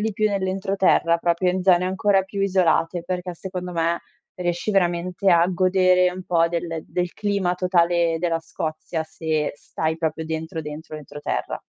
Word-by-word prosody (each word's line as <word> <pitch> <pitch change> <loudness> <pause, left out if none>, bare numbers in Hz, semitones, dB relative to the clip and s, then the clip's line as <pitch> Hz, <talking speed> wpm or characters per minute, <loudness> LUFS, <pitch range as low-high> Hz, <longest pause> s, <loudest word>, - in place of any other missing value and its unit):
di 220 0 0
più 215 +2 +1
nell'entroterra, 190 -3 +2
proprio 170 +2 +1
in 185 0 -2
zone 180 -1 +4
ancora 195 +1 +2
più 195 +1 -6
isolate, 180 -3 +2
perché 180 0 -3
secondo 180 0 -6
me 170 0 0 0.4
riesci 175 +3 -1
veramente 180 0 +1
a 170 -1 +5
godere 185 0 +3
un 185 +1 -7
po' 170 -1 +2
del 165 -2 -3
del 180 -1 -2
clima 200 -4 0
totale 175 -2 +2
della 165 -1 0
Scozia 160 0 -4
se 155 -1 -2
stai 160 +2 -3
proprio 160 0 -2
dentro, 160 +1 -4
dentro 150 +1 -8
l'entroterra. 145 0 -4
175 Hz, 155 wpm, -23 LUFS, 165-185 Hz, 0.4 s, a